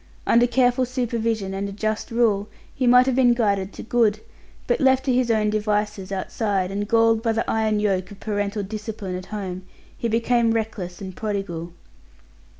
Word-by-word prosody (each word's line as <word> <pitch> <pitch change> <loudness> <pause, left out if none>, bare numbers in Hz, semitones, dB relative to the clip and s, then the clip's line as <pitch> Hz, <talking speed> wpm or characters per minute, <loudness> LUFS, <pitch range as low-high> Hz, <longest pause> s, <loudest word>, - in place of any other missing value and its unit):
Under 240 +1 +4
careful 250 0 +2
supervision 230 -5 -2
and 200 +1 -3
a - - -7
just 215 +2 -2
rule 220 -4 +1 0.2
he 255 - 0
might 250 +1 +7
have 260 -2 +1
been 245 -2 +4
guided 200 -4 0
to - - -8
good; 225 -3 +2 0.5
but - - +1
left 265 -1 +3
to 260 - +2
his 250 -1 +1
own 215 -2 +2
devices 210 -2 -1
outside, 195 -1 -1
and 205 +1 -3
galled 225 0 +3
by 225 -1 +1
the 225 - -1
iron 220 -1 +1
yoke 195 -3 0
of 205 -2 -12
parental 205 -1 -2
discipline 210 -1 -5
at 185 0 -7
home, 190 -4 -5 0.3
he 235 - -2
became 230 0 +2
reckless 205 -6 -4
and 190 -2 -7
prodigal. 195 -6 -4
215 Hz, 175 wpm, -23 LUFS, 200-235 Hz, 0.5 s, might